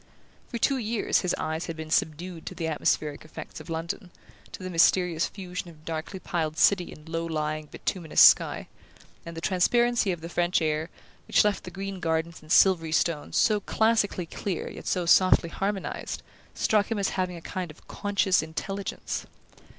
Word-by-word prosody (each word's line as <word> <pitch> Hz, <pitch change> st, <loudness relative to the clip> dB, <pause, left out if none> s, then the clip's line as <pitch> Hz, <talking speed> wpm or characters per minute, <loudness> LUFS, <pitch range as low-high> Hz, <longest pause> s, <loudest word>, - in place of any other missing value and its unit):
For 235 Hz, -, -4 dB
two 270 Hz, +3 st, +2 dB
years 225 Hz, -1 st, +1 dB
his 180 Hz, -, 0 dB
eyes 160 Hz, +1 st, -3 dB
had 165 Hz, -, -4 dB
been 155 Hz, 0 st, -7 dB
subdued 165 Hz, +3 st, -1 dB
to -, -, -5 dB
the 165 Hz, -3 st, -3 dB
atmospheric 150 Hz, -1 st, 0 dB
effects 155 Hz, -, -9 dB
of -, -, -12 dB
London, 165 Hz, +4 st, -4 dB, 0.4 s
to -, -, -8 dB
the 185 Hz, -, -4 dB
mysterious 175 Hz, 0 st, +3 dB
fusion 180 Hz, -2 st, -6 dB
of 155 Hz, -2 st, -17 dB
darkly 165 Hz, +4 st, -4 dB
piled 160 Hz, -4 st, -2 dB
city 180 Hz, 0 st, +4 dB
and 150 Hz, +1 st, -13 dB
low 165 Hz, 0 st, -2 dB
lying 155 Hz, -1 st, -2 dB
bituminous 165 Hz, +1 st, -2 dB
sky; -, -, +6 dB, 0.6 s
and 165 Hz, -1 st, -7 dB
the -, -, -4 dB
transparency 230 Hz, +4 st, +2 dB
of 175 Hz, -3 st, -4 dB
the 165 Hz, -, -6 dB
French 175 Hz, +1 st, +1 dB
air, 155 Hz, 0 st, -1 dB, 0.4 s
which -, -, +5 dB
left 210 Hz, -2 st, 0 dB
the -, -, -6 dB
green 195 Hz, +1 st, -5 dB
gardens 160 Hz, -1 st, -1 dB
and 155 Hz, 0 st, -11 dB
silvery 175 Hz, -5 st, +5 dB
stones 165 Hz, -2 st, 0 dB
so 215 Hz, -2 st, +4 dB
classically 215 Hz, -3 st, +1 dB
clear 180 Hz, +2 st, -4 dB
yet -, -, -9 dB
so 180 Hz, -1 st, 0 dB
softly 185 Hz, -1 st, +5 dB
harmonized, 195 Hz, +2 st, -3 dB, 0.3 s
struck 210 Hz, -2 st, +2 dB
him 225 Hz, -, -1 dB
as 200 Hz, -1 st, +1 dB
having 185 Hz, -1 st, -2 dB
a -, -, -7 dB
kind 185 Hz, 0 st, -4 dB
of 155 Hz, -, -15 dB
conscious 200 Hz, -3 st, +1 dB
intelligence. 195 Hz, +5 st, -4 dB
175 Hz, 175 wpm, -27 LUFS, 160-195 Hz, 0.6 s, sky